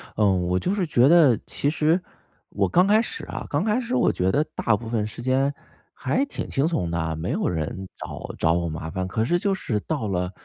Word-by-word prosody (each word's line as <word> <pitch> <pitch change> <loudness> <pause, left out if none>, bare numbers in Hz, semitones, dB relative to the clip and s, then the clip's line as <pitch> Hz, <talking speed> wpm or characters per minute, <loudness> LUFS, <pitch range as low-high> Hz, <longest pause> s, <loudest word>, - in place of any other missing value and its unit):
呃， 105 - +2
我 90 0 0
就 190 - -1
是 195 -3 0
觉 125 -2 +4
得， 155 -9 +6
其 145 - -1
实 160 +3 +2 0.5
我 - - 0
刚 180 +2 +4
开 215 +2 +5
始 - - -6
啊， - - -6
刚 145 +4 0
开 215 +3 +1
始 245 +2 -2
我 245 - +3
觉 95 +1 0
得 150 - +2
大 115 - +2
部 115 +1 -9
分 110 -2 -1
时 110 +2 -8
间 135 +3 +1 0.4
还 140 - 0
挺 - - -6
轻 140 +4 +1
松 90 - -1
的， 85 -1 -2
没 80 +3 -3
有 - - 0
人 90 +3 -3
找 - - -7
找 80 - +2
我 85 -1 0
麻 80 +1 -5
烦。 95 +2 -3
可 110 +4 -1
是 175 +8 +2
就 200 +1 +1
是 110 - -2
到 145 -9 -3
了 90 -1 -1
120 Hz, 245 characters per minute, -24 LUFS, -, 0.5 s, 得